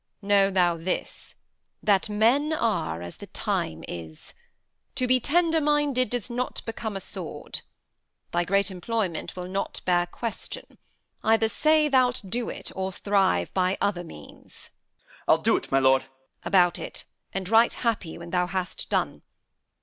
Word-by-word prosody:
Know 200 -1 +4
thou 175 -3 +2
this, 175 +3 -4 0.5
that 200 0 +3
men 240 +9 +3
Are 175 - 0
as 85 - -7
the - - -10
time 80 0 -2
is. 80 -2 -8 0.6
To 255 - +1
be 255 0 +4
tender 325 +4 +2
minded 290 -5 +2
Does 245 -1 -3
not 245 +1 -3
become 220 -2 -4
a - - -4
sword. - - -6 0.7
Thy 175 0 +1
great 200 +2 +1
employment 190 -1 -2
Will 180 -1 -5
not 195 +2 -3
bear 175 -1 +3
question. 225 +5 -6 0.4
Either 225 0 +4
say 310 +5 +3
thou'lt 255 -6 +2
do't, 235 +5 -3
Or 190 0 -2
thrive 190 - +1
by 185 0 +1
other 185 -3 0
means. 75 - -11
Capt. - - -41 0.5
I'll - - +6
do't, - - +1
my 135 - +4
lord. 130 0 +5
Edm. - - -18 0.4
About 180 -3 +4
it! - - -6 0.3
and 190 -1 -3
write 225 +3 +5
happy 205 -8 -1
when 170 0 -9
th' 180 -1 +1
hast 185 -1 -3
done. - - 0
195 Hz, 150 wpm, -26 LUFS, 175-240 Hz, 0.7 s, I'll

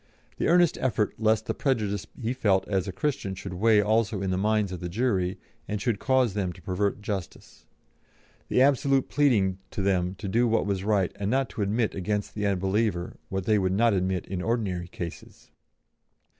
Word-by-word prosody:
The - - 0
earnest 175 -1 +4
effort 110 -5 +1
lest 110 -1 +2
the - - -1
prejudice 105 -8 -1
he 120 0 -1
felt 100 -7 +1
as 95 -1 0
a - - -2
Christian 100 -2 -2
should 95 0 -7
weigh 105 +3 +4
also 110 0 +1
in 95 -1 -1
the - - +1
minds 105 -1 +1
of 90 - -5
the 90 - -5
jury, 95 -3 0 0.3
and 105 - -2
should 100 0 -1
cause 130 -4 +2
them 95 -3 -1
to 90 - -15
pervert 100 +3 -1
justice. 100 -4 -6 0.8
The 130 - +4
absolute 135 -1 +2
pleading 105 -10 +2
to 100 - -4
them 95 -1 +1
to 100 +2 -6
do 120 +5 +2
what 115 -3 +1
was 100 -2 -1
right 100 -3 +1
and 100 0 -2
not 130 +1 +1
to - - -5
admit 110 +3 0
against 105 +2 -2
the 105 -1 -1
unbeliever 95 -1 0
what 95 -1 -3
they 105 -1 +3
would 95 -1 +1
not 115 +2 +3
admit 95 -1 0
in 95 -1 -4
ordinary 95 -6 -1
cases. 85 -2 -9
100 Hz, 190 wpm, -27 LUFS, 95-115 Hz, 0.8 s, earnest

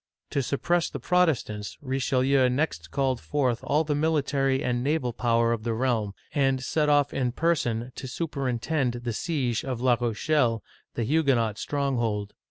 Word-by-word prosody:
To 140 - +1
suppress 170 +6 0
the - - -6
Protestants, 145 -13 0
Richelieu 130 -1 +2
next 125 - -1
called 130 +4 0
forth 130 -5 0
all 150 +3 +2
the 150 -1 -1
military 140 -3 +1
and 120 0 0
naval 140 -4 0
power 115 -1 +2
of 115 - -3
the 115 0 -2
realm, 110 -5 0 0.2
and 135 -2 +1
set 150 +2 +1
off 145 -1 +3
in 125 -2 0
person 125 -8 0
to 130 - -5
superintend 135 -1 -1
the 120 -2 -2
siege 130 -5 -1
of 130 -3 -3
La 125 0 +3
Rochelle, 120 0 +1 0.3
the 120 - -1
Huguenot 120 -6 +1
stronghold. 120 -8 -1
130 Hz, 155 wpm, -26 LUFS, 120-145 Hz, 0.3 s, off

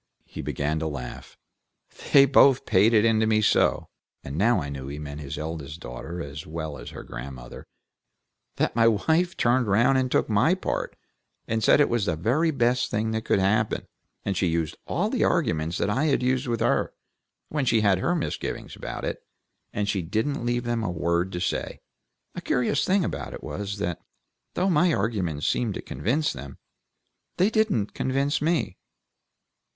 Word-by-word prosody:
He - - -7
began 75 +2 -2
with - - -7
a 80 - -1
laugh, 65 -5 -7 0.7
"They 140 -1 +8
both 135 -1 +5
paid 100 +5 +4
it 110 -1 +4
into 110 -1 +3
me 110 -1 +3
so," - - +2 0.3
and 70 - -6
now 110 +5 +3
I 70 - -4
knew 70 -2 -6
that 70 - -6
he - - -6
meant 75 0 -7
his 70 +1 -6
eldest 80 0 -5
daughter 80 +8 -7
as 70 +2 -8
well 80 -3 -5
as - - -8
her - - -9
grandmother, 60 0 -9 0.9
"that - - 0
my 115 -1 +5
wife 160 - +2
turned 120 0 +2
round 120 +7 +4
and 130 -1 0
took - - +2
my 115 - +3
part, 190 - -3 0.5
and 110 0 -1
said - - +5
it 145 - +5
was 115 -4 0
the 85 - +1
very 125 - +1
best 125 -4 +1
thing 110 +1 -1
that 110 0 -3
could - - +2
happen; 105 +3 +1 0.4
and 100 - -1
she 90 - +1
used 80 -2 -1
all - - 0
the - - +1
arguments 80 +3 +1
that 100 - 0
I 135 +8 +1
had 135 -5 +2
used 130 +1 +1
with 115 -2 -1
her, - - +1 0.5
when 150 -3 -1
she 115 -3 +3
had 100 -3 +3
her 175 - +1
misgivings 165 - -4
about - - -6
it, - - -4 0.5
and 105 0 -2
she 100 -2 0
didn't 110 - -2
leave 120 0 0
them 120 -1 -1
a 100 - -1
word 85 +2 0
to 90 - -3
say. 90 - -2 0.5
A - - -6
curious 125 +3 +1
thing 190 -1 +2
about - - -4
it - - -11
was, 105 0 -4
that 90 -5 -3 0.5
though 190 - +1
my 175 -1 +3
arguments 95 -8 -1
seemed 115 -5 0
to - - -4
convince 120 - -1
them, 70 0 -9 0.8
they 195 +4 +3
didn't 215 - +1
convince 140 +3 0
me. 155 - 0
105 Hz, 190 wpm, -25 LUFS, 80-130 Hz, 0.9 s, They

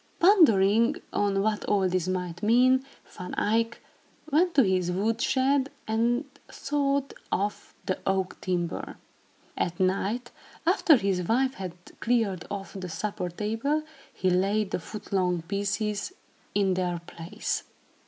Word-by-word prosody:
Pondering 235 - +5 0.2
on 200 -1 +1
what 215 0 0
all 195 -2 +2
this 185 -1 0
might 180 -2 -3
mean, 255 +4 +4 0.2
Van 180 0 -8
Eyck 230 +2 0 0.5
went 340 +4 +3
to 270 - +7
his 185 -3 +1
wood 210 +5 0
shed 270 +1 +2 0.2
and 235 +5 +1 0.2
sawed 280 -1 -1 0.2
off 205 +2 -2
the 185 - -1
oak 190 -1 -1
timber. 175 -2 -2 0.6
At 175 -1 -2
night, 200 +6 0 0.3
after 345 -3 +5
his 195 -4 0
wife 255 +8 +1
had 185 -6 -6 0.3
cleared 220 -7 0
off 195 -1 -6
the 185 -3 -6
supper 185 +2 -3
table, 225 - -1 0.3
he 185 - 0
laid 195 +3 +1
the - - -1
foot 210 +4 -9
long 180 -3 +1
pieces 205 - -2 0.4
in 195 -2 +3
their 180 -1 -1
place. 170 +1 -4
205 Hz, 135 wpm, -27 LUFS, 185-240 Hz, 0.6 s, to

